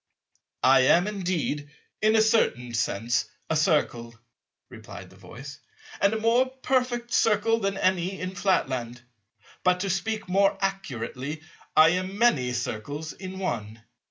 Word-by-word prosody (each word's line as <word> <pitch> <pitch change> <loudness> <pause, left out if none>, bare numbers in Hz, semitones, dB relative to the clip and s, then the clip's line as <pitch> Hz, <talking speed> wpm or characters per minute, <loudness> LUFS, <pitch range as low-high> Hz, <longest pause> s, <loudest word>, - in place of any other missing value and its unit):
"I 135 +1 +6
am 175 +2 +5
indeed, 180 -8 -2 0.3
in 215 +1 +3
a 220 - +5
certain 125 - +1
sense 115 +1 0 0.3
a - - +2
Circle," 145 -8 0 0.5
replied - - -11
the - - -17
Voice, 135 +4 -11 0.4
"and 200 - +4
a - - -2
more 235 +4 +3
perfect 250 -2 -1
Circle 225 +1 +3
than 195 -2 -2
any 185 0 0
in 185 +1 -4
Flatland; 130 - -1 0.6
but 180 0 +2
to 195 -1 -1
speak 205 +4 -2
more 195 +2 +2
accurately, 150 - -4 0.3
I 155 +1 +8
am 185 +3 -2
many 150 - +3
Circles 140 +6 -4
in 190 0 -8
one." 115 - -4
180 Hz, 135 wpm, -26 LUFS, 130-200 Hz, 0.6 s, I